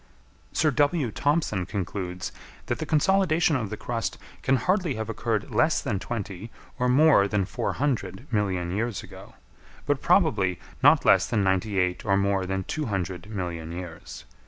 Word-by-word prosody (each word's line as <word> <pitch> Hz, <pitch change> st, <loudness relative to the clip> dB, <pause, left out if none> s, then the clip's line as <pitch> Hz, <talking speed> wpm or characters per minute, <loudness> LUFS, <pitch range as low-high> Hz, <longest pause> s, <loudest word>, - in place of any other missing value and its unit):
Sir 155 Hz, -1 st, +2 dB
W. 145 Hz, -2 st, +1 dB
Thompson 145 Hz, -, 0 dB
concludes 90 Hz, -2 st, -4 dB, 0.3 s
that -, -, -2 dB
the -, -, -4 dB
consolidation 165 Hz, -1 st, +3 dB
of 110 Hz, -6 st, -2 dB
the 110 Hz, -, -5 dB
crust 115 Hz, -6 st, -3 dB, 0.2 s
can 135 Hz, -, +3 dB
hardly 180 Hz, 0 st, +1 dB
have 110 Hz, 0 st, -4 dB
occurred 110 Hz, -1 st, -2 dB
less 155 Hz, +9 st, +3 dB
than 110 Hz, -9 st, -2 dB
twenty 100 Hz, -1 st, -5 dB, 0.3 s
or 125 Hz, 0 st, +2 dB
more 135 Hz, -6 st, +5 dB
than 100 Hz, -2 st, 0 dB
four -, -, -2 dB
hundred 120 Hz, -6 st, -2 dB
million 95 Hz, -5 st, 0 dB
years 110 Hz, 0 st, -2 dB
ago, -, -, -13 dB, 0.5 s
but 145 Hz, -2 st, 0 dB
probably 110 Hz, -, +3 dB, 0.2 s
not -, -, +6 dB
less -, -, +5 dB
than 110 Hz, -4 st, +1 dB
ninety 95 Hz, +2 st, 0 dB
eight 90 Hz, -1 st, 0 dB
or 100 Hz, -2 st, +2 dB
more 100 Hz, -1 st, +1 dB
than 95 Hz, 0 st, -2 dB
two 150 Hz, +7 st, -3 dB
hundred 95 Hz, -2 st, -3 dB
million 85 Hz, -6 st, -4 dB
years. 85 Hz, -1 st, -8 dB
105 Hz, 160 wpm, -26 LUFS, 95-140 Hz, 0.5 s, not